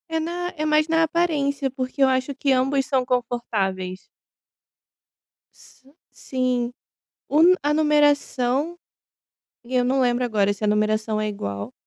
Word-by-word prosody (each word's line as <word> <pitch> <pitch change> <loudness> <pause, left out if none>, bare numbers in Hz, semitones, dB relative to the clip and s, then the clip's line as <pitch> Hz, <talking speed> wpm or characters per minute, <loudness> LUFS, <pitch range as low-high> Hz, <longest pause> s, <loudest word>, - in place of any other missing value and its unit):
É - - +2
na 350 +2 -3
é 310 - -2
mais 305 +1 +2
na 325 0 +3
aparência, 295 -5 0
porque 260 +1 -5
eu - - +6
acho 260 +2 0
que 275 +1 0
ambos 270 +1 +1
são 265 -4 0
confortáveis. 205 -7 -2 1.5
Si 265 +1 -21 0.2
sim. 250 -2 -2 0.6
Um 325 +5 +5
a 295 - +1
numeração 295 0 +1 0.9
e 255 +2 -3
eu 245 - +3
não 265 +2 +1
lembro 245 0 +1
agora 205 -4 +1
se 205 +1 -6
a - - +2
numeração 215 +1 0
é 215 - -1
igual. 100 - -5
260 Hz, 140 wpm, -23 LUFS, 225-295 Hz, 1.5 s, eu